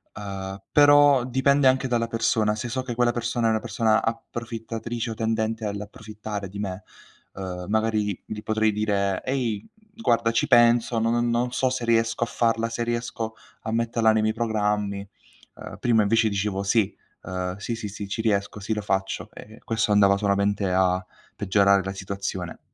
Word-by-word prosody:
Uhm, 100 -1 -6
però 145 -3 +6
dipende 135 +2 +3
anche 130 0 +3
dalla 115 -2 0
persona. 110 -2 +1
Se 110 +3 -4
so 130 +2 -2
che 125 -2 -4
quella 120 0 +3
persona 120 0 -1
è - - +3
una 110 0 +2
persona 110 -1 +1
approfittatrice 115 0 -4
o - - -2
tendente 110 0 -1
all'approfittare 105 0 -6
di 100 +1 -8
me, 95 -1 -4 0.5
uhm, 90 -2 -6
magari 110 -2 0
gli 105 0 -6
potrei 110 0 +1
dire: 100 -2 0
"Ehi, 120 -6 -2 0.3
guarda, 115 - +1
ci 150 +5 +1
penso. 120 -2 +4
Non 120 +1 +1
non 120 +1 0
so 130 0 +1
se 125 -2 -3
riesco 115 0 +2
a - - -2
farla, 115 -1 +1
se 120 0 -2
riesco 115 -1 -3 0.3
a 110 - -4
metterla 115 -1 +2
nei 110 0 +2
miei 110 - +1
programmi;" 105 -3 -1 0.6
ehm, - - -9
prima 115 -3 +3
invece 110 +1 +3
dicevo: 100 0 -1
"Sì, 105 0 +1 0.3
uhm, 90 0 -3
sì, 115 +3 -4
sì, 110 -2 -5
sì, 100 0 -7
ci 105 +3 -3
riesco, 100 -2 0
sì, 110 +2 -2
lo 105 - -2
faccio," 95 -1 -2
e 110 +1 -12
questo 110 -2 0
andava 100 -1 +5
solamente 100 -1 +1
a 90 0 +2 0.3
peggiorare 100 0 +3
la 95 +1 -4
situazione. 95 -2 -5
110 Hz, 170 wpm, -25 LUFS, 100-115 Hz, 0.6 s, però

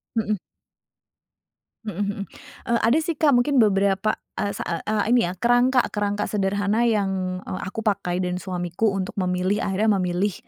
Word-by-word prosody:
Mhm. 215 -2 0 1.5
Mhm 210 - -4
mhm. 200 +1 -2 0.5
Eee, 235 0 +2
ada, 230 +6 +4
sih, 325 +1 -2
Kak, 290 0 +3
mungkin 250 +3 +3
beberapa, 200 0 +2 0.2
eee, 200 - -1
sa - - -5
eee 165 - -3
eee, 215 -1 0
ini, 245 - +4
ya, 175 - -2
kerangka 245 +3 +4
kerangka 205 0 -1
sederhana 205 +2 0
yang, 195 -5 0
eee, 185 - -5
aku 190 +4 -5
pakai 200 -5 -1
dan 180 -1 -1
suamiku 180 +3 -1
untuk 195 -1 -3
memilih, 185 +1 0
akhirnya 205 +2 +2
memilih 180 +3 0
200 Hz, 160 wpm, -23 LUFS, 185-220 Hz, 1.5 s, ada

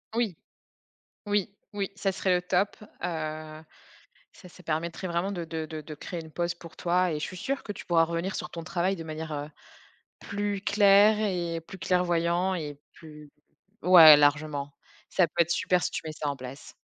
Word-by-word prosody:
Oui! 225 -8 0 0.9
Oui, 205 -1 0 0.2
oui. 200 -2 -2
Ca 195 -1 0
serait, 185 -1 +1
heu, - - -3
top, 180 +3 0
heu, 155 -5 -6 0.7
ça 180 - -14
ça 180 - -16
permettrait 170 +3 -3
vraiment 175 +4 -1
de 175 -3 -4
de 160 -1 -5
de 155 0 -6
de 155 +1 -8
créer 170 +3 -6
une 160 -1 -11
pause 170 +1 -2
pour 170 -2 -13
toi, 180 +1 +1
et - - -2
je - - -3
suis 185 - -7
sûre 275 +9 -3
que 205 - -5
tu - - -10
pourras 165 -2 +4
revenir 170 +3 -3
sur - - -5
ton 170 - -7
travail 180 +3 0
de 165 - -7
manière, 155 0 -6
heu, 145 0 -4 0.7
plus 205 -1 -3
claire 205 +1 +5
et 175 -5 -1
plus 190 +4 -11
clairvoyant 175 0 +1
et 145 -4 -6
plus 150 -2 -13 0.5
ouais, 165 -5 +10
largement. 145 -1 +1 0.4
Ca 180 - +3
peut 170 +2 +1
être 170 - -6
super 180 +1 +2
si - - -1
tu - - -3
mets 155 - -4
ça 150 - -4
en 140 - -2
place. 130 +1 -10
170 Hz, 190 wpm, -27 LUFS, 155-190 Hz, 0.9 s, ouais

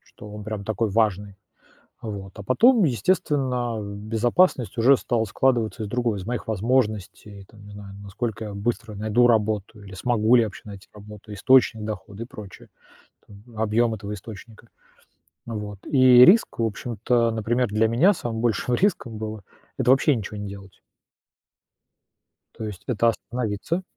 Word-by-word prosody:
Что 105 - -11
он 105 0 -8
прям 110 -2 -5
такой 110 +1 -1
важный, 100 -2 0 0.7
вот. 100 -4 -7
А 100 - -9
потом, 225 - +4
естественно, 125 - 0
безопасность 115 - 0
уже 130 +4 +5
стала 120 -2 -1
складываться 115 0 0
из - - -4
другого: 120 -1 -1
из 95 - -7
моих 120 +2 -4
возможностей, 105 -3 -2
там, 105 -2 -17
не 105 - -12
знаю, 100 -1 -10
насколько 110 +2 -5
я 105 - -7
быстро 110 +2 -3
найду 110 +4 +2
работу 110 -2 0
или 100 -1 -12
смогу 115 +3 +2
ли 120 - +6
я 110 - 0
вообще 105 - -12
найти 100 -1 -11
работу, 105 0 -13
источник 110 +1 +3
дохода 105 0 -6
и - - -9
прочее, 105 -5 -12 0.6
там, 100 -1 -15 0.2
объём 110 +1 +1
этого 105 0 -6
источника, 110 +3 -12 0.8
вот. 105 -3 -6
И 130 -3 +7
риск, 215 +6 +4
в 115 - +1
общем-то, 115 +2 0
например, 115 +3 0
для 110 +2 +1
меня 145 - +4
самым 115 -8 -5
большим 120 +1 0
риском 125 - 0
было- 110 -2 -6 0.3
это 125 - +3
вообще 140 +2 +4
ничего 105 -2 -6
не 105 0 -5
делать. 100 -2 -12 1.7
То 110 - -6
есть 105 -4 -8
это 115 -1 +2
остановиться 120 - -3
110 Hz, 155 wpm, -24 LUFS, 105-120 Hz, 1.7 s, И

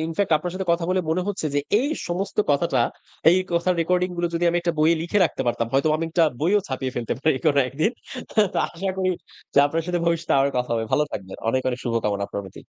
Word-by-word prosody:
infact 165 +4 -1
আপনার 175 +3 -5
সাথে 190 0 -4
কথা 170 0 0
বলে 185 - +2
মনে 180 +3 +1
হচ্ছে 190 -6 -2
যে 145 - +3 0.2
এই 270 - 0 0.2
সমস্ত 185 +3 -3
কথাটা 140 -2 +2 0.5
এই 180 - +4
কথার 170 +2 +2
রেকর্ডিংগুলো 180 0 0
যদি 170 - 0
আমি 175 - 0
একটা 170 0 0
বইয়ে 160 +2 +4
লিখে 175 +5 0
রাখতে 145 - -2
পারতাম, 115 -1 0
হয়তো 140 +3 +3
আমি 165 - -2
একটা 165 0 +3 0.2
বইও 185 +7 +3
ছাপিয়ে 130 -1 -3
ফেলতে 120 -2 -2
পারি 155 -1 +3
কোনো 145 -2 +4
একদিন। 155 - 0 0.4
হ্যা? 215 - +5
তো - - +1
আশা 190 +3 -4
করি 185 -1 +1 0.4
যে - - +5
আপনার 165 +3 -1
সাথে 175 -1 0
ভবিষ্যতে 170 -1 0
আবার 135 +1 +3
কথা 125 -1 -1
হবে। 115 -1 -1
ভালো 150 - +3
থাকবেন। 95 -1 -6
অনেক, 130 +2 +1
অনেক 125 0 -2
শুভকামনা 105 -4 0
আপনার 100 - -5
প্রতি। 95 - -11
165 Hz, 225 wpm, -23 LUFS, 135-180 Hz, 0.5 s, হ্যা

